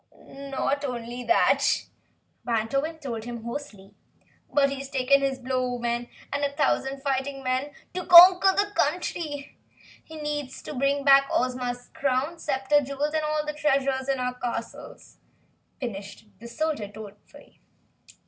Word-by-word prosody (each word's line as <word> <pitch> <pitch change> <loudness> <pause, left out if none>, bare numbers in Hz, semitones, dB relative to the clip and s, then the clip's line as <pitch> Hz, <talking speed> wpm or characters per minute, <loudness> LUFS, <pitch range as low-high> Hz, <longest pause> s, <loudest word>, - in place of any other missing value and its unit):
"Not 275 +1 -3
only 245 -2 -5
that," 345 - +3 0.6
Wantowin 275 +8 -1
told 235 -7 -5
him 235 -2 -7
hoarsely, 235 -6 -8 0.6
"but 280 -1 +3
he's 275 0 -6
taken 275 0 +3
his 270 -1 0
Blowmen 245 -2 -2 0.2
and 285 0 -1
a 285 - +1
thousand 275 -2 0
fighting 275 0 -2
men 255 +2 -1 0.2
to 365 -1 -5
conquer 360 +2 +9
the 410 +1 0
country! 300 -4 -2 0.4
He 315 - -11
intends 295 -3 -4
to - - -7
bring 275 +1 0
back 275 0 +6
Ozma's 250 -1 -2
crown, 280 +5 -1
scepter, 285 0 +1
jewels 280 +2 -3
and 315 - +1
all 305 0 -1
the 300 - -3
treasures 275 -3 0
in 270 -1 0
our 250 0 -1
castle!" 245 -1 -6 0.8
finished 200 -4 -7
the 235 - -10
Soldier, 305 -4 -2
dolefully. 205 0 -14
275 Hz, 135 wpm, -26 LUFS, 250-295 Hz, 0.8 s, conquer